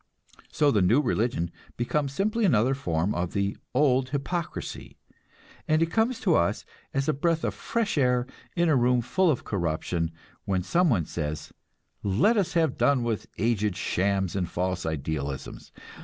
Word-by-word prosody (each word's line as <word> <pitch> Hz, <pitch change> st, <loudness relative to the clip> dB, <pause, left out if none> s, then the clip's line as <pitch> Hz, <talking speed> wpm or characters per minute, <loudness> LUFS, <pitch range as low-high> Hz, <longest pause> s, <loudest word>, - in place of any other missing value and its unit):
So 145 Hz, -1 st, +3 dB
the 105 Hz, -, +3 dB
new 105 Hz, +9 st, +4 dB
religion 115 Hz, -, 0 dB, 0.3 s
becomes 140 Hz, +4 st, 0 dB
simply 215 Hz, +9 st, 0 dB
another 130 Hz, -, +3 dB
form 90 Hz, -8 st, -1 dB
of 90 Hz, 0 st, -2 dB
the 100 Hz, +1 st, 0 dB, 0.2 s
old 130 Hz, -2 st, +3 dB
hypocrisy; 155 Hz, +4 st, -4 dB, 0.7 s
and 155 Hz, 0 st, +3 dB
it 165 Hz, -, -2 dB
comes 225 Hz, +2 st, +1 dB
to 185 Hz, -6 st, +3 dB
us 85 Hz, -, +1 dB, 0.3 s
as 135 Hz, 0 st, -1 dB
a 155 Hz, -, +3 dB
breath 165 Hz, +3 st, 0 dB
of -, -, 0 dB
fresh 225 Hz, -9 st, -1 dB
air 125 Hz, -2 st, +2 dB, 0.3 s
in 175 Hz, -1 st, +2 dB
a 155 Hz, -, +4 dB
room 125 Hz, 0 st, +3 dB
full 185 Hz, +9 st, +2 dB
of 140 Hz, -, 0 dB
corruption 85 Hz, -2 st, -1 dB, 0.4 s
when 95 Hz, -2 st, 0 dB
some 175 Hz, -, +2 dB
one 95 Hz, -, +2 dB
says, 75 Hz, -1 st, -4 dB, 0.5 s
"Let 105 Hz, -, +3 dB
us 200 Hz, -5 st, 0 dB
have 160 Hz, -5 st, +1 dB
done 140 Hz, -4 st, +3 dB
with 115 Hz, -3 st, -2 dB
aged 105 Hz, -3 st, +1 dB
shams 95 Hz, 0 st, 0 dB
and 90 Hz, -3 st, -1 dB
false 90 Hz, -1 st, -2 dB
idealisms. 70 Hz, -3 st, -4 dB
120 Hz, 160 wpm, -27 LUFS, 90-155 Hz, 0.7 s, new